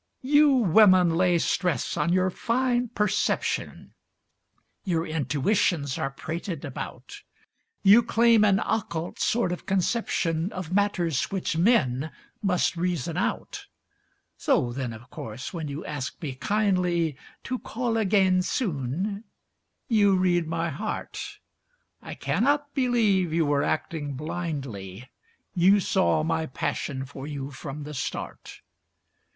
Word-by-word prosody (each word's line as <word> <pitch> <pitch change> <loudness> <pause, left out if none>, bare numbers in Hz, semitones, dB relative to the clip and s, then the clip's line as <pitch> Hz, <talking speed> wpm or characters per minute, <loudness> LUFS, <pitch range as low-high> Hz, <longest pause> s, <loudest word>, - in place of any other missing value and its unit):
You 290 +2 +5
women 185 -5 +5
lay 180 0 +3
stress 170 -4 0
on 170 - 0
your 185 +1 +2
fine 245 +3 0
perception, 210 -3 -1 0.9
Your 170 -3 0
intuitions 155 - 0
are 135 - -1
prated 160 +3 -5
about; 135 - -8 0.6
You 205 +4 +8
claim 230 -1 +4
an 195 -2 +4
occult 170 -6 -2
sort 235 -6 +1
of 180 - -6
conception 185 -3 0
Of 180 -2 -5
matters 185 -7 +1
which 195 -4 -3
men 160 - +2 0.3
must 180 -3 +1
reason 175 -5 -2
out. - - -3 0.7
So 120 - +1
then, 130 -2 -3
of 115 +3 -11
course, 115 - -7
when 165 -3 -4
you 140 +2 -6
ask 140 -3 -5
me 145 -5 -4
kindly 180 -2 +1 0.3
"To 255 -1 -3
call 235 -1 -2
again 190 -4 +3
soon," 185 - -2 0.6
you 205 -4 +4
read 175 -3 +2
my 165 0 -2
heart. 140 - -5 0.6
I - - -8
cannot 280 - 0
believe 225 - +2
you 165 0 +2
were 145 -1 +2
acting 150 -1 -2
blindly; 135 - -5 0.4
You 190 +3 +5
saw 185 -4 +2
my 160 0 -1
passion 135 0 -3
for 135 +1 -9
you 140 -2 -5
from 140 +2 -7
the 150 +1 -7
start. 130 - -6
175 Hz, 125 wpm, -26 LUFS, 145-205 Hz, 0.9 s, You